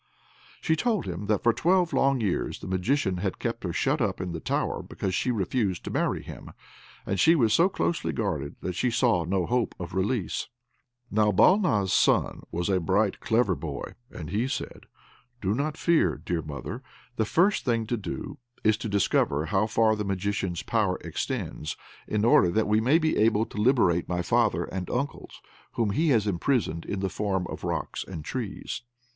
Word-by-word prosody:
She 160 - +2
told 220 0 0
him 95 +2 -5
that 105 -1 +1
for 120 - +4
twelve 175 +3 +2
long 135 -2 +2
years 100 -5 -1
the - - -8
Magician 95 +2 0
had 95 +1 -2
kept 115 0 -3
her 90 - -2
shut - - 0
up - - 0
in 90 -1 -3
the 85 - -4
tower - - -1
because 95 -2 -4
she 125 - 0
refused 100 -4 -1
to - - -5
marry - - 0
him, - - -10 0.5
and 95 - -2
she 165 - +6
was 115 -8 +3
so 170 - +5
closely 170 -3 -1
guarded 80 -10 -2
that 90 - -3
she 125 +8 0
saw 120 -7 +2
no 90 +1 0
hope 120 +2 0
of 90 -1 -6
release. 95 +2 -1 0.6
Now 105 0 +3
Balna's 130 - +4
son - - +2
was 85 +1 -2
a 95 -2 +2
bright, 95 +4 +1
clever 110 -3 +2
boy, 70 - -6 0.2
so 80 - -7
he 105 +10 -1
said, - - -5 0.5
"Do 100 -2 0
not 150 +6 -2
fear, 170 -2 +3
dear 85 -2 -3
mother; 75 - -6 0.3
the 110 - +1
first 180 - +2
thing 115 -3 0
to 120 - -1
do 140 +6 -6 0.2
is 110 -1 +3
to 110 - -5
discover 80 -6 +1
how 95 +5 +1
far 110 0 +3
the 105 - -3
Magician's 95 -2 -2
power 105 -5 +1
extends, 75 -1 -4 0.3
in 105 0 0
order 95 -6 +5
that 110 +5 +1
we 105 +1 +3
may 130 +8 +4
be 160 -1 +1
able 110 0 +3
to 105 - -5
liberate 105 -8 +3
my 90 -1 -1
father 115 +1 +2
and 95 -1 -5
uncles, 140 +4 -4 0.3
whom 110 -3 0
he 160 +10 +1
has 115 -6 +3
imprisoned 95 - 0
in 100 - -3
the 95 - 0
form 95 -1 -1
of - - -7
rocks - - -3
and 80 -5 -8
trees. 120 -4 -4
105 Hz, 185 wpm, -27 LUFS, 95-125 Hz, 0.6 s, she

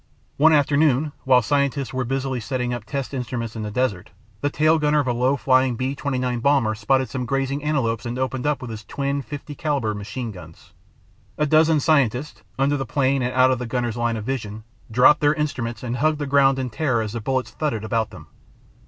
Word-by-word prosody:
One 160 +3 +6
afternoon 145 -1 +3
while 125 -2 +5
scientists 140 +1 0
were 130 0 -1
busily 135 0 -2
setting 125 0 -2
up 120 -3 -5
test 140 +2 -4
instruments 120 -3 -4
in 110 - -4
the 105 - -4
desert, 105 -4 -1 0.3
the 145 - +1
tail 155 +2 +3
gunner 150 0 +2
of 145 - 0
a 120 - +1
low 125 +4 +1
flying 130 -1 +2
B 130 +3 -2
29 130 -3 -2
bomber 130 -4 +2
spotted 130 +5 +1
some 125 -2 -4
grazing 135 +1 -1
antelopes 120 -8 0
and 120 +1 -4
opened 130 +1 -2
up 145 -2 -1
with 120 - -6
his 110 0 -7
twin.50 140 +3 -4
caliber 140 -9 -1
machine 110 +3 -5
guns. 85 -4 -14 0.6
"A 150 - +2
dozen 155 +1 +4
scientists,... 140 -2 +1 0.2
under 140 +2 +2
the 135 - -2
plane 135 +2 +1
and 125 0 -1
out 130 0 +5
of 130 - 0
the 125 - -4
gunner's 120 -2 -2
line 120 -1 -1
of 105 - -6
vision, 110 -5 -4 0.3
dropped 125 +6 +5
their 145 0 +3
instruments 120 -7 -3
and 125 0 -3
hugged 155 +4 +2
the 145 - -3
ground 135 -1 +4
in 130 -2 -3
terror 120 -2 0
as 105 -1 -5
the 115 - -4
bullets 130 +3 -1
thudded 130 -9 -2
about 110 0 -1
them." - - -12
130 Hz, 205 wpm, -22 LUFS, 120-140 Hz, 0.6 s, One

